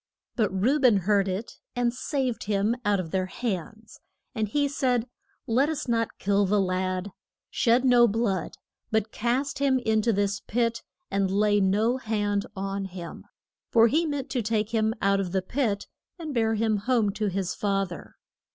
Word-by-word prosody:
But 215 -5 +1
Reu 240 +10 +1
ben 245 -6 +6
heard 200 +1 +2
it, 195 +5 -4 0.2
and 240 -1 +1
saved 255 -1 -2
him 205 +2 +1
out 205 -2 +2
of 165 -3 -5
their 185 -1 0
hands. 220 +1 -5 0.3
And 220 -4 -1
he 285 +7 +1
said, 250 -4 0 0.4
Let 260 +6 +2
us 315 -4 -3
not 230 -1 0
kill 200 0 +2
the 205 +2 +2
lad. 185 0 -1 0.4
Shed 245 +2 +3
no 245 -2 +6
blood; 205 -4 -1 0.3
but 220 0 0
cast 255 +5 -1
him 275 -2 +3
in 220 -3 +1
to 230 - +2
this 200 -1 0
pit, 230 +1 -1 0.3
and 195 -1 +1
lay 205 +1 +3
no 210 +6 +2
hand 205 -4 -1
on 195 0 -3
him. 180 -3 -8 0.4
For 230 0 +5
he 320 +5 +2
meant 285 -3 -3
to 250 - 0
take 215 -1 -1
him 220 -1 +1
out 200 0 +3
of 185 -2 -3
the 190 - +1
pit, 215 -2 -1 0.3
and 315 -4 -6
bear 225 -2 +1
him 220 -1 +1
home 225 -1 +1
to 210 +1 -2
his 190 -2 -2
fath 195 -2 -1
er. 170 - -10
215 Hz, 180 wpm, -26 LUFS, 195-240 Hz, 0.4 s, ben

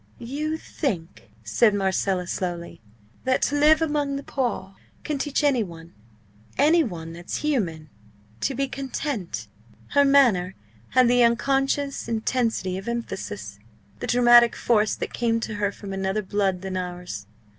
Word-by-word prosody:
"You 300 +6 -3
think," 195 - -4
said 205 - +3
Marcella, 190 -1 0
slowly, 175 -4 -4 0.4
"that 260 0 +1
to 290 - +1
live 310 +2 +5
among 295 -3 0
the 280 - -4
poor 240 -9 -2 0.3
can 295 -2 -2
teach 290 +1 -1
any 275 -5 +3
one 170 -4 -8 0.6
any 320 +4 +5
one 165 - -6
that's 175 +1 -5
human 175 - -1 0.5
to 270 - -1
be 275 +2 0
content!" 260 - -4 0.4
Her 285 - +4
manner 240 -10 +4 0.4
had 255 -1 +6
the 245 +1 +4
unconscious 270 +4 +1
intensity 225 -4 -1
of 195 - -11
emphasis, 105 - -5 0.4
the - - -4
dramatic 240 -1 +6
force 215 -2 +2
that - - -5
came 230 -1 +1
to 220 - -4
her 205 -1 +1
from 200 -1 -8
another 195 +2 -1
blood 190 -1 0
than 190 -1 -3
ours. 180 - -5
230 Hz, 145 wpm, -24 LUFS, 185-275 Hz, 0.6 s, had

